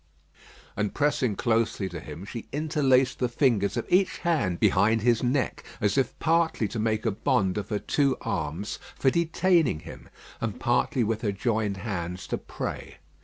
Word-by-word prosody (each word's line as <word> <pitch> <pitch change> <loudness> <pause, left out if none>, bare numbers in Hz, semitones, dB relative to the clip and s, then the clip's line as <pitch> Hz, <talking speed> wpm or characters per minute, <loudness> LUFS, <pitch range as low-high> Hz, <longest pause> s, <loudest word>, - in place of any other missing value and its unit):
And 105 -1 -2
pressing 145 -7 +1
closely 115 -4 0
to 90 -1 -6
him, 80 +3 -9
she 115 +2 -7
interlaced 140 -4 +2
the 125 - +1
fingers 115 -6 +1
of - - -1
each 185 +1 +2
hand 125 - +1
behind 110 +3 +3
his 120 -2 +3
neck, 130 +2 0 0.2
as 105 -4 +1
if 135 -2 0
partly 165 -7 +1
to 115 - -4
make 110 0 0
a 115 - +2
bond 105 -3 +1
of 105 - -4
her 105 - 0
two 140 +5 +1
arms 80 +8 -3 0.2
for 135 - +3
detaining 170 - +2
him, - - -11 0.3
and - - -3
partly 125 - +1
with 110 0 -1
her 105 - 0
joined 105 -1 -1
hands 90 -4 -4
to - - -1
pray. - - -6
115 Hz, 170 wpm, -27 LUFS, 100-140 Hz, 0.3 s, behind